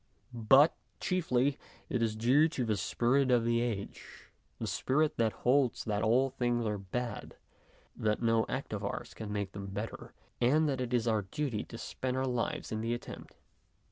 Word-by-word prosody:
But, 135 Hz, +7 st, +6 dB, 0.3 s
chiefly, 140 Hz, -7 st, +1 dB, 0.3 s
it 125 Hz, -7 st, -1 dB
is 110 Hz, -2 st, +1 dB
due 130 Hz, +8 st, +4 dB
to 130 Hz, -6 st, -2 dB
the 110 Hz, -2 st, +1 dB
spirit 125 Hz, +7 st, +1 dB
of 120 Hz, -2 st, +3 dB
the 115 Hz, 0 st, +2 dB
age, 110 Hz, -5 st, -5 dB, 0.3 s
the -, -, -4 dB
spirit 150 Hz, +3 st, +1 dB
that 115 Hz, -2 st, +2 dB
holds 130 Hz, 0 st, +3 dB
that 105 Hz, -2 st, -1 dB
all 125 Hz, +5 st, +3 dB
things 120 Hz, -2 st, 0 dB
are 105 Hz, -1 st, -1 dB
bad, 115 Hz, +4 st, -5 dB, 0.6 s
that 105 Hz, -1 st, 0 dB
no 115 Hz, -1 st, +3 dB
act 130 Hz, -4 st, -3 dB
of 105 Hz, -1 st, -3 dB
ours 100 Hz, -, -4 dB
can 110 Hz, -2 st, -7 dB
make 100 Hz, -2 st, -2 dB
them 100 Hz, -1 st, -7 dB
better, 100 Hz, +3 st, -6 dB, 0.3 s
and 150 Hz, +6 st, +4 dB
that 135 Hz, -3 st, -1 dB
it 125 Hz, -1 st, -3 dB
is 120 Hz, -2 st, +1 dB
our 110 Hz, -2 st, +2 dB
duty 110 Hz, +3 st, -3 dB
to 115 Hz, -, -9 dB
spend 130 Hz, +2 st, -3 dB
our 130 Hz, -, 0 dB
lives 125 Hz, -2 st, -2 dB
in 110 Hz, 0 st, -2 dB
the 115 Hz, +1 st, 0 dB
attempt. 120 Hz, -, -10 dB
120 Hz, 180 wpm, -32 LUFS, 110-130 Hz, 0.6 s, But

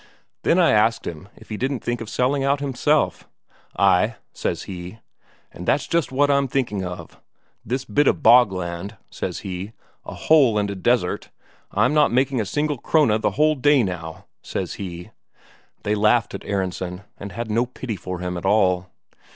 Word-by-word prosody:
Then 170 Hz, -, +2 dB
I 175 Hz, -2 st, +5 dB
asked 110 Hz, +2 st, +2 dB
him 85 Hz, +4 st, -7 dB
if -, -, -17 dB
he 105 Hz, -, -4 dB
didn't 130 Hz, +1 st, -2 dB
think 120 Hz, -1 st, -2 dB
of 110 Hz, -, -6 dB
selling 135 Hz, +4 st, +1 dB
out 140 Hz, +1 st, +2 dB
himself. 145 Hz, +2 st, 0 dB, 0.5 s
'Ay,' 100 Hz, +4 st, +3 dB, 0.2 s
says -, -, -3 dB
he, 90 Hz, +2 st, -8 dB, 0.6 s
'that's 130 Hz, +10 st, 0 dB
just 165 Hz, -5 st, 0 dB
what 145 Hz, +2 st, +3 dB
I'm 140 Hz, -1 st, +2 dB
thinking 120 Hz, -7 st, -1 dB
of. 90 Hz, -1 st, -8 dB, 0.4 s
This 130 Hz, +4 st, -3 dB
bit 145 Hz, -1 st, +2 dB
of -, -, +1 dB
bogland,' 95 Hz, -6 st, +3 dB
says -, -, -4 dB
he, 95 Hz, +3 st, -5 dB, 0.3 s
'a -, -, -8 dB
hole 135 Hz, -9 st, +4 dB
and 100 Hz, -1 st, 0 dB
a -, -, -5 dB
desert 110 Hz, -1 st, 0 dB, 0.4 s
I'm -, -, +2 dB
not 150 Hz, -1 st, +4 dB
making 130 Hz, 0 st, +1 dB
a 105 Hz, -, -4 dB
single 150 Hz, +1 st, -1 dB
Krone 120 Hz, -10 st, +2 dB
the 105 Hz, -, +2 dB
whole 155 Hz, 0 st, +4 dB
day 145 Hz, -2 st, +3 dB
now,' 85 Hz, -5 st, -5 dB, 0.2 s
says -, -, -4 dB
he." 90 Hz, -2 st, -7 dB, 0.7 s
They 105 Hz, -, 0 dB
laughed 105 Hz, +2 st, +2 dB
at -, -, -7 dB
Aronsen, 95 Hz, -1 st, -3 dB, 0.2 s
and 100 Hz, 0 st, -7 dB
had 115 Hz, -2 st, -4 dB
no 120 Hz, +3 st, +1 dB
pity 125 Hz, -2 st, -5 dB
for 90 Hz, 0 st, -6 dB
him 90 Hz, 0 st, -3 dB
at 85 Hz, -, -6 dB
all. 90 Hz, -3 st, +2 dB
110 Hz, 175 wpm, -22 LUFS, 95-135 Hz, 0.7 s, I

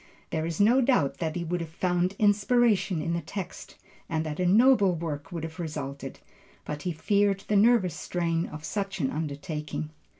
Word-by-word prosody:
There 160 Hz, 0 st, -1 dB
is 165 Hz, -1 st, -4 dB
no 235 Hz, +6 st, +5 dB
doubt 150 Hz, -, +2 dB
that 160 Hz, -2 st, -2 dB
he 175 Hz, -, -2 dB
would 175 Hz, +1 st, -2 dB
have 165 Hz, -, -5 dB
found 180 Hz, +2 st, 0 dB
inspiration 205 Hz, -4 st, +3 dB
in 170 Hz, +1 st, -1 dB
the 170 Hz, -, -1 dB
text, 190 Hz, -1 st, -7 dB, 0.3 s
and 160 Hz, -1 st, -1 dB
that 155 Hz, +1 st, -4 dB
a 180 Hz, -, +2 dB
noble 205 Hz, -2 st, +5 dB
work 155 Hz, -1 st, -5 dB
would 170 Hz, -2 st, -5 dB
have 160 Hz, +2 st, -7 dB
resulted, 140 Hz, -4 st, -5 dB, 0.5 s
but 150 Hz, 0 st, -5 dB
he 180 Hz, -, -2 dB
feared 200 Hz, +4 st, +1 dB
the 210 Hz, -, -1 dB
nervous 205 Hz, -4 st, +4 dB
strain 170 Hz, 0 st, -1 dB
of 155 Hz, +1 st, -8 dB
such 195 Hz, -2 st, -3 dB
an 135 Hz, -5 st, 0 dB
undertaking. 150 Hz, 0 st, -4 dB
170 Hz, 180 wpm, -27 LUFS, 155-200 Hz, 0.5 s, no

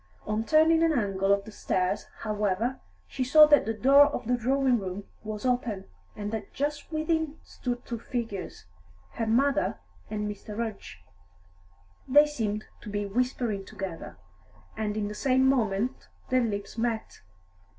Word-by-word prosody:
On 215 Hz, +1 st, -1 dB
turning 315 Hz, +5 st, +4 dB
an 330 Hz, -1 st, +4 dB
angle 195 Hz, -3 st, +1 dB
of 200 Hz, 0 st, +2 dB
the 220 Hz, -, -9 dB
stairs, 185 Hz, -1 st, -1 dB
however, 215 Hz, +3 st, -1 dB, 0.3 s
she 260 Hz, -, -2 dB
saw 305 Hz, +4 st, +8 dB
that 295 Hz, -6 st, +4 dB
the 225 Hz, -, 0 dB
door 275 Hz, +5 st, +7 dB
of 290 Hz, -, -4 dB
the 245 Hz, +2 st, +2 dB
drawing 255 Hz, +1 st, +2 dB
room 190 Hz, +1 st, -5 dB, 0.2 s
was 215 Hz, +1 st, -5 dB
open, 245 Hz, -6 st, 0 dB, 0.3 s
and 205 Hz, 0 st, -4 dB
that 220 Hz, -3 st, -6 dB
just 290 Hz, +2 st, -3 dB
within 315 Hz, -1 st, -1 dB
stood 245 Hz, -1 st, -5 dB
two 235 Hz, -2 st, -4 dB
figures 225 Hz, -, -5 dB, 0.5 s
her 225 Hz, -, -3 dB
mother 275 Hz, +5 st, +2 dB, 0.3 s
and 210 Hz, -1 st, -2 dB
Mr. 210 Hz, +1 st, -7 dB
Rudge. 215 Hz, -, -5 dB, 1.0 s
They 290 Hz, +3 st, +7 dB
seemed 215 Hz, -8 st, -3 dB, 0.2 s
to -, -, -8 dB
be 205 Hz, 0 st, -2 dB
whispering 230 Hz, -1 st, -1 dB
together, 180 Hz, -, -7 dB, 0.6 s
and 215 Hz, -1 st, -2 dB
in 210 Hz, -1 st, -1 dB
the 210 Hz, -, -5 dB
same 260 Hz, +4 st, +2 dB
moment 240 Hz, -1 st, 0 dB, 0.2 s
their 255 Hz, 0 st, +3 dB
lips 205 Hz, 0 st, -3 dB
met. 230 Hz, -1 st, -2 dB
225 Hz, 150 wpm, -28 LUFS, 205-265 Hz, 1.0 s, saw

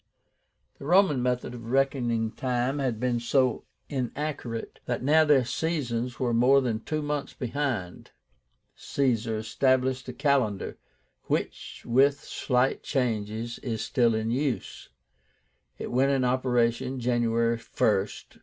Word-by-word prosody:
The -, -, -9 dB
Roman 175 Hz, -5 st, +4 dB
method 125 Hz, 0 st, -1 dB
of 115 Hz, -2 st, -9 dB
reckoning 120 Hz, -4 st, +1 dB
time 125 Hz, +3 st, -1 dB
had 125 Hz, -5 st, -1 dB
been 125 Hz, -1 st, 0 dB
so 125 Hz, +1 st, +1 dB, 0.2 s
inaccurate, 130 Hz, -3 st, -4 dB
that 125 Hz, 0 st, -2 dB
now 155 Hz, +4 st, +5 dB
their 140 Hz, -4 st, +4 dB
seasons 125 Hz, -4 st, -2 dB
were 120 Hz, -2 st, 0 dB
more 125 Hz, +4 st, +5 dB
than 120 Hz, -5 st, -1 dB
two 155 Hz, +5 st, -3 dB
months 145 Hz, -1 st, -3 dB
behind. 125 Hz, -8 st, -3 dB, 0.7 s
Caesar 115 Hz, -5 st, 0 dB
established 130 Hz, +4 st, +1 dB
a -, -, -5 dB
calendar, 135 Hz, -8 st, 0 dB, 0.5 s
which, -, -, -3 dB
with 140 Hz, +4 st, +3 dB
slight 125 Hz, 0 st, 0 dB
changes, 115 Hz, -3 st, -2 dB
is 110 Hz, -4 st, -3 dB
still 120 Hz, -2 st, +2 dB
in 110 Hz, +1 st, -1 dB
use. 135 Hz, 0 st, -2 dB, 0.9 s
It -, -, -6 dB
went 130 Hz, +3 st, +3 dB
into 130 Hz, -2 st, +2 dB
operation 125 Hz, 0 st, +1 dB
January 115 Hz, -1 st, +1 dB
1st, 115 Hz, -, -18 dB, 0.6 s
45. -, -, -24 dB
125 Hz, 125 wpm, -27 LUFS, 115-135 Hz, 0.9 s, now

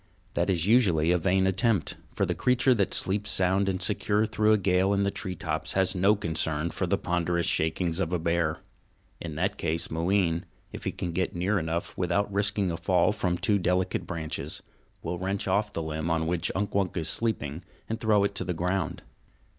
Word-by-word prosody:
That -, -, 0 dB
is 85 Hz, -3 st, +2 dB
usually 95 Hz, -8 st, +4 dB
a 90 Hz, -, +3 dB
vain 95 Hz, +2 st, +2 dB
attempt; 95 Hz, -, +1 dB, 0.2 s
for -, -, +1 dB
the -, -, -1 dB
creature 125 Hz, +1 st, +3 dB
that 100 Hz, -5 st, 0 dB
sleeps 105 Hz, +2 st, +1 dB
sound 95 Hz, +1 st, +2 dB
and 95 Hz, -1 st, -1 dB
secure 105 Hz, +2 st, +1 dB
through 110 Hz, 0 st, +2 dB
a 110 Hz, -, +5 dB
gale 95 Hz, 0 st, +2 dB
in 100 Hz, 0 st, +1 dB
the 100 Hz, -, +1 dB
tree 95 Hz, -2 st, -4 dB
tops 80 Hz, -1 st, -3 dB
has 95 Hz, -1 st, +2 dB
no 100 Hz, +3 st, +3 dB
concern 80 Hz, -3 st, -1 dB
for -, -, -2 dB
the -, -, +1 dB
ponderous 85 Hz, -1 st, 0 dB
shakings 80 Hz, +2 st, 0 dB
of 90 Hz, -3 st, -1 dB
a 90 Hz, -, +1 dB
bear. 85 Hz, -1 st, 0 dB, 0.6 s
In 80 Hz, -3 st, -6 dB
that 95 Hz, +6 st, -1 dB
case 80 Hz, 0 st, -1 dB
Mooween, 85 Hz, 0 st, +1 dB, 0.3 s
if -, -, -8 dB
he -, -, 0 dB
can 90 Hz, -, -4 dB
get 90 Hz, +2 st, -2 dB
near 95 Hz, +4 st, +1 dB
enough 80 Hz, +1 st, -3 dB
without 95 Hz, +3 st, 0 dB
risking 100 Hz, -2 st, +1 dB
a 85 Hz, -, -3 dB
fall 90 Hz, +3 st, +2 dB
from 95 Hz, -4 st, -1 dB
too 100 Hz, +2 st, +1 dB
delicate 90 Hz, 0 st, 0 dB
branches, 80 Hz, -4 st, -4 dB, 0.4 s
will 90 Hz, +1 st, -3 dB
wrench 95 Hz, +2 st, -2 dB
off 105 Hz, +1 st, +1 dB
the 80 Hz, -, -3 dB
limb 80 Hz, +1 st, -3 dB
on 80 Hz, 0 st, +1 dB
which 85 Hz, +1 st, 0 dB
Unk 100 Hz, +2 st, -2 dB
Wunk 95 Hz, -2 st, 0 dB
is 80 Hz, -2 st, -1 dB
sleeping 80 Hz, -8 st, -1 dB, 0.3 s
and 115 Hz, 0 st, -3 dB
throw 105 Hz, -3 st, +3 dB
it 100 Hz, -, 0 dB
to 100 Hz, -, 0 dB
the 90 Hz, -, -3 dB
ground. 90 Hz, +2 st, -2 dB
90 Hz, 200 wpm, -27 LUFS, 85-100 Hz, 0.6 s, a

